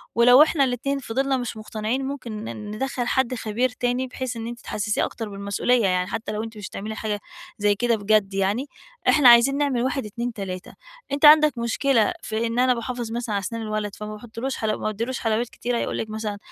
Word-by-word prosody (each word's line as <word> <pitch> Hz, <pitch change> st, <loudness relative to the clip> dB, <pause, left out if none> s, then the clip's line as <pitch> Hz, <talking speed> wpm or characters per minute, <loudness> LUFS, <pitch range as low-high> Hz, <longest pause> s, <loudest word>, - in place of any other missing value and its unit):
ولو 245 Hz, +4 st, +8 dB
إحنا 310 Hz, -2 st, +2 dB
الاتنين 270 Hz, +2 st, -1 dB
فِضلنا 265 Hz, +2 st, 0 dB
مش 240 Hz, -2 st, -4 dB
مُقتنعين 220 Hz, +4 st, -3 dB
ممكن 240 Hz, -6 st, -5 dB
ن 210 Hz, -1 st, -6 dB
ندخل 245 Hz, +2 st, -2 dB
حد 260 Hz, -1 st, +1 dB
خبير 230 Hz, +3 st, 0 dB
تاني 245 Hz, +1 st, -1 dB
بحيث 255 Hz, -1 st, -5 dB
إن 230 Hz, 0 st, -5 dB
أنتِ 240 Hz, 0 st, -7 dB
تحسسيه 210 Hz, 0 st, -1 dB
أكتر 225 Hz, -2 st, -6 dB
بالمسؤولية، 200 Hz, +5 st, 0 dB
يعني 180 Hz, 0 st, +1 dB
حتى 220 Hz, -1 st, -4 dB
لو 215 Hz, +1 st, -3 dB
أنتِ 225 Hz, -1 st, -8 dB
مش 205 Hz, -2 st, -7 dB
هتعملي 215 Hz, +2 st, -6 dB
حاجة 210 Hz, -2 st, -3 dB, 0.4 s
زي 205 Hz, -1 st, +2 dB
كده 235 Hz, +2 st, +1 dB
بجد 205 Hz, -1 st, +2 dB
يعني، 195 Hz, +7 st, 0 dB, 0.4 s
إحنا 290 Hz, -5 st, +7 dB
عايزين 240 Hz, +4 st, +6 dB
نعمل 275 Hz, -5 st, +1 dB
1 260 Hz, -2 st, -1 dB
2 235 Hz, +3 st, -4 dB
3. 185 Hz, -4 st, -6 dB, 0.4 s
أنت 280 Hz, +2 st, +2 dB
عندك 300 Hz, -2 st, +7 dB
مشكلة 235 Hz, +5 st, +2 dB
في 225 Hz, -2 st, -2 dB
إن 230 Hz, +1 st, -2 dB
أنا 255 Hz, 0 st, +4 dB
باحافظ 240 Hz, -1 st, -4 dB
مثلًا 235 Hz, -3 st, -2 dB
علي -, -, +1 dB
اسنان 230 Hz, +4 st, -4 dB
الولد 215 Hz, -2 st, -3 dB
فما 210 Hz, 0 st, -6 dB
باحطلوش 235 Hz, +4 st, -5 dB
حَلَو 215 Hz, -1 st, -1 dB
ما -, -, -8 dB
باديلوش 230 Hz, +4 st, -2 dB
حلويات 225 Hz, +1 st, 0 dB
كتيرة؟ 240 Hz, -1 st, -3 dB
هيقول -, -, -2 dB
لِك 220 Hz, -, -3 dB
مثلًا: 215 Hz, -1 st, -4 dB
230 Hz, 205 wpm, -24 LUFS, 215-255 Hz, 0.4 s, ولو